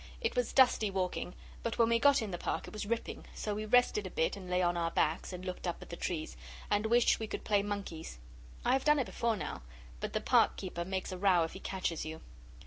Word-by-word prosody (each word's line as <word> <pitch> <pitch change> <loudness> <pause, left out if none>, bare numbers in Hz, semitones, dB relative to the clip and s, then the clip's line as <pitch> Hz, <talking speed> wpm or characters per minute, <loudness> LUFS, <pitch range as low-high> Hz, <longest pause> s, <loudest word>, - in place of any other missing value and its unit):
It 460 - -1
was 245 -1 +1
dusty 245 -5 +5
walking, 185 -1 -2 0.3
but 230 - -2
when 230 -1 +4
we 230 0 +3
got 280 -1 +5
in 210 - -4
the 175 - -4
Park - - -2
it - - -10
was 210 -1 -4
ripping, 230 +1 -3
so 210 - -2
we 215 +1 -4
rested 235 -4 +3
a - - -6
bit, 160 - 0
and 185 -2 -9
lay 180 0 +2
on 175 0 +2
our 170 -1 0
backs, 160 +1 0
and 180 0 -7
looked 185 0 -4
up 175 - -2
at - - -11
the - - -4
trees, 160 - -3 0.4
and 205 +1 +2
wished 235 +1 +4
we 220 - -3
could - - -5
play 205 -2 +3
monkeys. 200 - -5 0.5
I - - +4
have 265 0 +2
done 300 0 +5
it 270 - +1
before 230 -1 0
now, 185 - -5 0.4
but - - -4
the - - +1
Park - - +4
keeper 175 -2 -4
makes 190 +1 -3
a 185 - -5
row 185 -3 +4
if 160 - -4
he 190 - -8
catches 185 -4 -2
you. 160 0 -6
195 Hz, 250 wpm, -33 LUFS, 175-230 Hz, 0.5 s, dusty